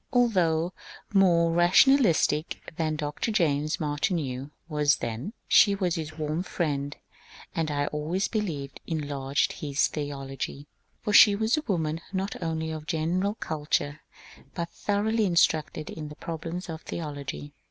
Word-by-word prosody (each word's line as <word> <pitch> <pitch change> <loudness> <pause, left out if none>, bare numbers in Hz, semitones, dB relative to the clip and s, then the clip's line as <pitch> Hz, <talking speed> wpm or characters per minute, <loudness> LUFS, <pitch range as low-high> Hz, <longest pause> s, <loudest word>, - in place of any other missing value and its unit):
Although 180 - +2 0.4
more 170 -4 +4
rationalistic 175 - +3
than 155 -1 0
Dr. 150 +7 -2
James 155 -7 +1
Martineau 145 -3 -1 0.2
was 150 -2 +3
then, 120 - -4
she 200 -2 +6
was 185 -3 0
his 155 -1 -5
warm 155 +2 -1
friend, 145 -6 -2 0.6
and 160 -1 -1
I 145 -1 0
always 155 +7 -1
believe 160 - -3 0.2
enlarged 145 -3 -1
his 140 -2 0
theology; 140 -1 -5 0.4
for 210 - -1
she 205 0 +9
was 220 +3 +2
a 305 - -1
woman 165 -5 -1
not 195 0 -3
only 160 -1 -2
of 155 -1 -6
general 180 +6 0
cul 155 -7 -5
ture 145 0 0 0.6
but 170 -1 -3
thoroughly 215 +2 0
instructed 160 -3 +1
in 150 -2 -6
the 150 - -10
problems 165 +3 -5
of 160 -1 -6
theology. 145 -2 -6
160 Hz, 135 wpm, -27 LUFS, 150-185 Hz, 0.6 s, she